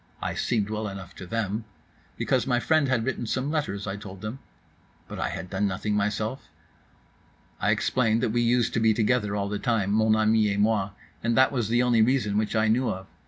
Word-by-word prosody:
I - - -3
seemed 110 -4 -1
well 110 0 -2
enough 95 -2 -8
to 90 - -8
them.—Because 110 +4 -3
my 120 -2 +2
friend 155 +2 +2
had 125 -4 +1
written 125 -3 -2
some 130 +6 -1
letters, 145 -11 -2
I 95 0 -4
told 95 -2 -10
them.—But 110 +6 -11
I - - -1
had 90 - -6
done 100 +1 +1
nothing 100 +2 -2
myself?—I 105 +5 -6
explained 115 -2 +1
that 115 - +1
we 120 +1 +1
used 120 0 +2
to - - +1
be 110 -1 +3
together 105 -2 +1
all 100 -1 -1
the 105 0 -3
time, 110 -6 0
mon 110 +1 +3
ami 110 -1 +3
et - - -2
moi; 105 -2 +2 0.3
that 115 +3 +3
was 120 -6 -1
the 120 +1 +3
only 120 -2 +3
reason 115 -3 +2
which 110 +1 -2
I 110 0 +3
knew 120 +4 +2
of. 95 +1 -4
110 Hz, 195 wpm, -26 LUFS, 105-120 Hz, 0.3 s, be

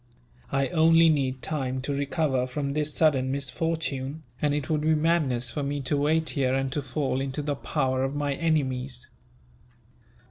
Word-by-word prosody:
I 135 0 +1
only 165 0 +5
need 135 -4 0
time 130 -4 -2
to 140 - -2
recover 140 -2 0
from 140 +2 -3
this 150 0 0
sudden 135 -5 +2
misfortune, 140 +1 -2 0.2
and 145 -1 +2
it 145 -3 -2
would 155 -2 0
be 155 +1 +3
madness 150 -7 +1
for 150 - -3
me 145 +1 -2
to 135 +2 -1
wait 155 +3 +1
here, 130 -3 +1
and 135 0 -1
to 145 - -1
fall 135 0 -1
into 135 +2 -3
the 145 0 -1
power 130 -2 -1
of 135 +2 -2
my 145 -1 0
enemies. 135 -5 -1
140 Hz, 170 wpm, -26 LUFS, 130-155 Hz, 0.2 s, only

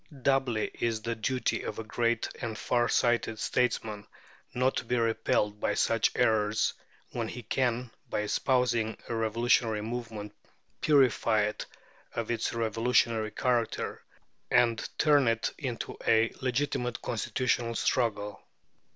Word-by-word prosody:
Doubly 135 -5 +1
is 115 -1 +1
it 110 - -13
the 115 0 -2
duty 125 +4 -1
of - - -5
a 110 - -4
great 115 +1 0
and 110 -2 -3
far 120 +1 +1
sighted 120 -2 +2
statesman 110 -3 -1 0.4
not 130 +2 +1
to - - -1
be 125 +2 0
repelled 115 -2 +1
by 105 - 0
such 115 -1 +2
errors, 110 -3 +2 0.4
when 115 -2 -2
he 120 +2 -7
can, 125 +1 0 0.2
by - - -1
espousing 120 0 +1
a - - -1
revolutionary 115 0 +2
movement, 110 -2 -5 0.5
purify 130 -7 +4
it 105 0 -3 0.5
of 115 0 -2
its 115 - -1
revolutionary 115 0 +1
character, 120 -1 -1 0.5
and 115 -1 +2
turn 145 -4 +4
it 115 0 +1
into 125 -5 -4
a 115 0 +4
legitimate 125 -2 -1
constitutional 120 +1 -1
struggle. 105 -4 0
115 Hz, 130 wpm, -29 LUFS, 110-125 Hz, 0.5 s, purify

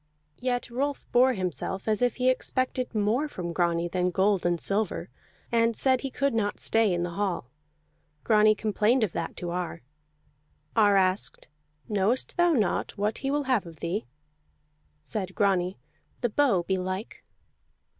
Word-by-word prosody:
Yet 245 -1 -2
Rolf 275 +3 -2
bore 255 +2 +5
himself 185 - -3
as 215 0 +1
if 245 -2 +2
he 255 0 +3
expected 255 -1 -1
more 220 +8 +1
from 175 - -5
Grani 170 -1 +1
than 180 +1 0
gold 190 0 +2
and 175 -1 0
silver, 205 +4 -1 0.4
and 230 -1 +3
said 260 -2 +3
he 275 - -3
could 275 +1 0
not 210 -2 -1
stay 225 -3 +2
in 175 -1 0
the 175 - -3
hall. 175 -9 -2 0.7
Grani 215 -1 +5
complained 215 +3 +2
of 205 - 0
that - - -4
to 175 -1 -4
Ar. 175 -3 -4 0.9
Ar 205 -3 +5
asked: 185 -3 0 0.4
"Knowest 210 +4 0
thou 350 -1 +4
not 215 - 0
what 210 +2 -1
he 270 - -2
will 290 +1 +1
have 255 -9 +1
of 165 -2 -12
thee?" 175 - -3 1.0
Said 190 +2 -4
Grani, 190 -2 +1 0.4
"The 240 - +1
bow, 230 -7 +2
belike." 185 +3 -3
210 Hz, 155 wpm, -27 LUFS, 185-245 Hz, 1.0 s, bore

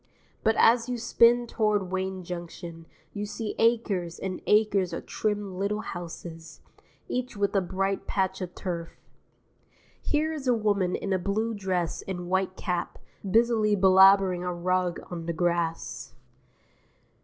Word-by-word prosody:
But 220 0 +3
as 235 +1 +4
you 245 - -1
spin 235 +1 +4
toward 210 -5 0
Wayne 190 0 -2
Junction 170 -1 -8 0.3
you 205 0 -4
see 220 +1 -4
acres 210 -7 +1
and 185 -1 -4
acres 210 -3 +3
of - - -5
trim 205 -3 -2
little 210 +2 -1
houses, 165 -2 -8 0.5
each 250 -2 -3
with 200 0 0
a 195 - +4
bright 195 +2 -2
patch 190 -1 -1
of 180 -1 -5
turf. 170 -3 -5 1.0
Here 310 +1 0
is 285 -4 -5
a 245 - +4
woman 205 -4 +1
in 200 - -2
a 185 - +1
blue 215 +5 -1
dress 185 -5 -2
and 180 -2 -6
white 190 0 0
cap, 180 -3 -3 0.3
busily 220 0 +3
belabouring 190 -1 +6
a 180 - -2
rug 180 0 0
on 170 -1 -5
the 170 - -1
grass. 165 -7 -2
190 Hz, 145 wpm, -27 LUFS, 175-215 Hz, 1.0 s, belabouring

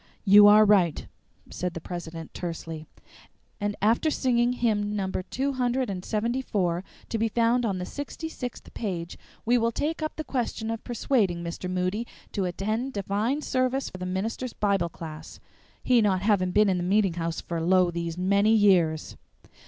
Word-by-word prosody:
"You 205 +1 +9
are 210 +1 +8
right," 190 -6 +3 0.5
said 180 -1 -3
the - - -3
president 165 -1 -7
tersely; 165 -2 -6 0.7
"and 205 0 -1
after 230 +9 +3
singing 245 -4 +1
hymn 210 -4 0
number 190 -2 -2
two 270 +9 -2
hundred 245 -7 -1
seventy 235 +4 -1
four, 180 -7 -1 0.3
to 225 - -2
be 225 - +2
found 235 +2 +2
on 195 -3 -1
the 180 - -4
sixty 290 - -6
sixth 250 -6 -7
page, 175 -6 -4 0.3
we 240 +2 +3
will 230 0 +1
take 315 +7 -2
up 310 - -3
the 310 - -4
question 230 -5 -2
of 225 - -5
persuading 215 -8 0
Mr. 170 +2 -5
Moody 185 +5 -1 0.2
to 195 -3 -1
attend 215 +8 -2
divine 210 +8 -1
service 255 +1 0
or 185 - -8
the 180 - -4
minister's 225 +6 -3
Bible 195 -4 +1
class, 160 -1 -9 0.4
he 245 -2 +4
not 190 -3 +1
having 200 -3 +2
been 210 +3 +4
in 185 -2 +2
the - - -2
meeting 195 0 +2
house 165 -1 -3
for 170 -1 -4
lo! 180 +1 +3
these 170 0 -4
many 200 +4 +3
years. 175 -7 +3
205 Hz, 170 wpm, -26 LUFS, 180-235 Hz, 0.7 s, You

